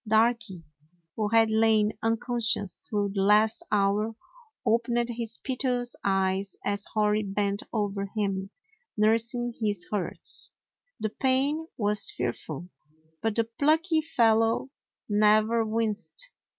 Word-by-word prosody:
Darky, 220 Hz, -4 st, +1 dB, 0.5 s
who 215 Hz, -2 st, 0 dB
had 225 Hz, 0 st, +4 dB
lain 220 Hz, -1 st, +3 dB
unconscious 225 Hz, -3 st, -1 dB
through 205 Hz, -2 st, 0 dB
the 195 Hz, -, 0 dB
last 210 Hz, +2 st, +4 dB
hour, 210 Hz, +2 st, +1 dB, 0.5 s
opened 235 Hz, +1 st, +1 dB
his 230 Hz, -1 st, -4 dB
piteous 250 Hz, -2 st, -1 dB
eyes 195 Hz, 0 st, 0 dB
as 200 Hz, 0 st, 0 dB
Hori 210 Hz, 0 st, +2 dB
bent 200 Hz, 0 st, -1 dB
over 200 Hz, -2 st, -2 dB
him, 195 Hz, -2 st, -1 dB, 0.5 s
nursing 230 Hz, +3 st, +1 dB
his 205 Hz, -4 st, 0 dB
hurts. 205 Hz, -4 st, 0 dB, 0.5 s
The 215 Hz, -, -2 dB
pain 275 Hz, +6 st, +1 dB
was 205 Hz, -2 st, +1 dB
fearful, 135 Hz, +7 st, -4 dB, 0.5 s
but 225 Hz, -2 st, -1 dB
the 230 Hz, -, +3 dB
plucky 315 Hz, +8 st, +2 dB
fellow 225 Hz, -3 st, +2 dB, 0.4 s
never 215 Hz, +2 st, +3 dB
winced. 220 Hz, -, -1 dB
220 Hz, 110 wpm, -27 LUFS, 205-235 Hz, 0.5 s, had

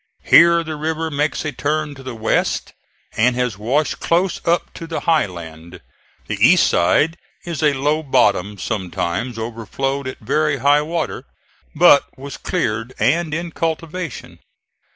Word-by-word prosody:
Here 170 Hz, 0 st, +6 dB
the 155 Hz, -1 st, -6 dB
river 160 Hz, +1 st, -2 dB
makes 150 Hz, +2 st, -1 dB
a 155 Hz, -, -1 dB
turn 150 Hz, +2 st, -2 dB
to 135 Hz, -, -12 dB
the 130 Hz, -2 st, -7 dB
west, 110 Hz, 0 st, -1 dB, 0.4 s
and 120 Hz, +3 st, +2 dB
has 125 Hz, -5 st, -2 dB
washed 135 Hz, +7 st, 0 dB
close 175 Hz, +2 st, 0 dB
up 170 Hz, +1 st, +1 dB
to 165 Hz, -, -8 dB
the 165 Hz, -, -4 dB
high 160 Hz, -8 st, +2 dB
land; 85 Hz, -2 st, -10 dB, 0.5 s
the -, -, -4 dB
east -, -, +6 dB
side 155 Hz, -, +2 dB, 0.3 s
is 170 Hz, -2 st, -4 dB
a 150 Hz, -2 st, +3 dB
low 145 Hz, +3 st, 0 dB
bottom, 105 Hz, -, +1 dB
sometimes 100 Hz, +3 st, -3 dB
overflowed 120 Hz, +5 st, -3 dB
at 130 Hz, -, -6 dB
very 150 Hz, -2 st, 0 dB
high 145 Hz, +3 st, +3 dB
water, 165 Hz, +2 st, -3 dB, 0.5 s
but 155 Hz, -3 st, +6 dB
was 140 Hz, +1 st, -8 dB
cleared 115 Hz, -, -2 dB
and 170 Hz, -1 st, +1 dB
in 170 Hz, +2 st, -3 dB
cultivation. 165 Hz, +1 st, -4 dB
145 Hz, 150 wpm, -19 LUFS, 120-160 Hz, 0.5 s, Here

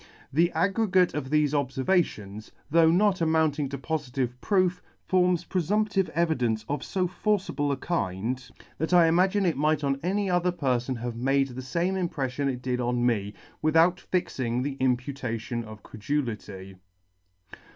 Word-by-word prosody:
The 170 Hz, +4 st, +3 dB
aggregate 190 Hz, -2 st, +2 dB
of 150 Hz, -3 st, -3 dB
thefe 150 Hz, 0 st, +3 dB
obfervations, 130 Hz, -, -1 dB, 0.2 s
though 165 Hz, 0 st, +5 dB
not 190 Hz, +2 st, +3 dB
amounting 160 Hz, -3 st, +1 dB
to 140 Hz, -, -4 dB
pofitive 135 Hz, -4 st, -2 dB
proof, 185 Hz, -3 st, +1 dB, 0.3 s
forms 180 Hz, -2 st, +2 dB
preemptive 195 Hz, +2 st, 0 dB
evidence 125 Hz, -10 st, 0 dB
of 145 Hz, +1 st, -2 dB
fo 185 Hz, -2 st, -1 dB
forcible 180 Hz, -6 st, -1 dB
a 140 Hz, -, -1 dB
kind, 120 Hz, -, -2 dB, 0.4 s
that 160 Hz, +3 st, -1 dB
I 175 Hz, -1 st, +7 dB
imagine 185 Hz, +4 st, +3 dB
it 165 Hz, -6 st, +1 dB
might 150 Hz, +1 st, +1 dB
on 140 Hz, -1 st, 0 dB
any 195 Hz, +4 st, 0 dB
other 180 Hz, 0 st, +2 dB
perfon 130 Hz, -6 st, -1 dB
have 120 Hz, -1 st, -4 dB
made 135 Hz, +2 st, +1 dB
the 130 Hz, +1 st, -7 dB
fame 170 Hz, +9 st, -1 dB
impreffion 140 Hz, -7 st, -2 dB
it 125 Hz, -1 st, -7 dB
did 125 Hz, -1 st, -1 dB
on 120 Hz, 0 st, 0 dB
me, 105 Hz, -4 st, 0 dB, 0.3 s
without 165 Hz, +3 st, +4 dB
fixing 125 Hz, -9 st, -2 dB
the 140 Hz, 0 st, -2 dB
imputation 125 Hz, -2 st, -2 dB
of 110 Hz, -1 st, -11 dB
credulity'. 105 Hz, -6 st, -4 dB
145 Hz, 145 wpm, -27 LUFS, 125-175 Hz, 0.4 s, I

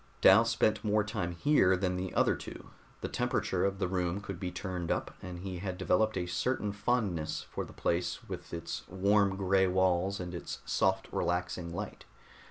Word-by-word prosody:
Dal 105 Hz, +5 st, +7 dB
spent 110 Hz, -2 st, +2 dB
more 105 Hz, 0 st, +2 dB
time 100 Hz, -5 st, -3 dB
here 95 Hz, -, +4 dB
than 90 Hz, -1 st, 0 dB
the 90 Hz, 0 st, -3 dB
other -, -, +4 dB
two; -, -, -9 dB, 0.3 s
the -, -, -2 dB
temperature -, -, 0 dB
of 100 Hz, 0 st, +1 dB
the 95 Hz, -, 0 dB
room 90 Hz, 0 st, -1 dB
could 100 Hz, -3 st, -6 dB
be 90 Hz, -, -2 dB
turned 90 Hz, -1 st, -4 dB
up, -, -, -1 dB
and 90 Hz, -1 st, -7 dB
he 95 Hz, -2 st, -5 dB
had 95 Hz, -1 st, -4 dB
developed 110 Hz, +4 st, +2 dB
a 90 Hz, -, -1 dB
certain 105 Hz, +4 st, -1 dB
fondness 100 Hz, -7 st, -1 dB
for -, -, -5 dB
the -, -, -10 dB
place 85 Hz, +1 st, -1 dB
with -, -, -7 dB
its 85 Hz, 0 st, -4 dB
warm 100 Hz, +1 st, +3 dB
gray 95 Hz, 0 st, +3 dB
walls 95 Hz, +1 st, +2 dB
and 90 Hz, 0 st, -5 dB
its 85 Hz, -, -6 dB
soft 95 Hz, 0 st, +1 dB
relaxing 90 Hz, 0 st, -1 dB
light. 100 Hz, +4 st, -6 dB
95 Hz, 180 wpm, -31 LUFS, 90-100 Hz, 0.3 s, Dal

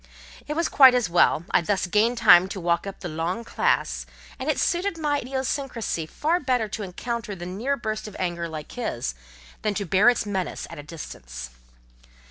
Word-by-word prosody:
It 300 Hz, -, -3 dB
was 335 Hz, 0 st, +1 dB
quite 265 Hz, -4 st, +7 dB
as 240 Hz, -9 st, +1 dB
well: 170 Hz, -1 st, +4 dB
I -, -, +4 dB
thus 190 Hz, +3 st, 0 dB
gained 215 Hz, +6 st, +2 dB
time 180 Hz, -4 st, +7 dB
to 195 Hz, -, -5 dB
walk 170 Hz, +2 st, 0 dB
up 195 Hz, -, -8 dB
the 180 Hz, -, -4 dB
long 170 Hz, +7 st, -3 dB
classe; -, -, 0 dB, 0.3 s
and -, -, -3 dB
it -, -, +1 dB
suited 355 Hz, +1 st, 0 dB
my 295 Hz, -2 st, 0 dB
idiosyncracy 255 Hz, -, -3 dB
far 330 Hz, +4 st, 0 dB
better 255 Hz, -7 st, 0 dB
to 215 Hz, -, -5 dB
encounter 210 Hz, +3 st, -4 dB
the 175 Hz, -1 st, -7 dB
near 225 Hz, +10 st, -2 dB
burst 215 Hz, -2 st, -4 dB
of 210 Hz, -, -10 dB
anger 170 Hz, -2 st, -2 dB
like 155 Hz, -2 st, -7 dB
his, 120 Hz, -, -3 dB, 0.5 s
than 210 Hz, -1 st, -1 dB
to 200 Hz, -, -2 dB
bear 190 Hz, +6 st, +5 dB
its 245 Hz, -, +1 dB
menace 190 Hz, -4 st, -3 dB
at -, -, -8 dB
a -, -, -7 dB
distance. 60 Hz, -, -8 dB
205 Hz, 190 wpm, -25 LUFS, 175-250 Hz, 0.5 s, quite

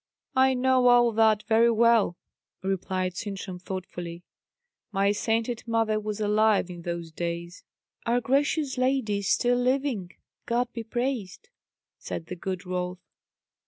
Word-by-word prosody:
"I 260 Hz, 0 st, +4 dB
know 255 Hz, 0 st, +3 dB
all 240 Hz, -1 st, +6 dB
that 220 Hz, -1 st, +3 dB
very 230 Hz, +1 st, +4 dB
well," 230 Hz, -5 st, +3 dB, 0.5 s
replied 185 Hz, -1 st, -1 dB
Sintram 195 Hz, -3 st, -5 dB
thoughtfully. 175 Hz, -2 st, -6 dB, 0.7 s
"My 200 Hz, 0 st, +2 dB
sainted 225 Hz, +3 st, -1 dB
mother 225 Hz, -2 st, +1 dB
was 215 Hz, 0 st, -4 dB
alive 210 Hz, -2 st, +2 dB
in 175 Hz, -1 st, -8 dB
those 170 Hz, -1 st, -5 dB
days." 170 Hz, +1 st, -5 dB, 0.4 s
"Our 240 Hz, +1 st, +3 dB
gracious 275 Hz, +2 st, 0 dB
lady 255 Hz, -6 st, +1 dB
is 200 Hz, -, -4 dB
still 245 Hz, 0 st, +3 dB
living, 250 Hz, -8 st, 0 dB, 0.3 s
God 240 Hz, +1 st, 0 dB
be 230 Hz, -, -4 dB
praised," 240 Hz, -, -3 dB, 0.5 s
said 165 Hz, -, -5 dB
the 180 Hz, -, -6 dB
good 185 Hz, +1 st, -5 dB
Rolf. 180 Hz, 0 st, -3 dB
215 Hz, 130 wpm, -27 LUFS, 185-245 Hz, 0.7 s, all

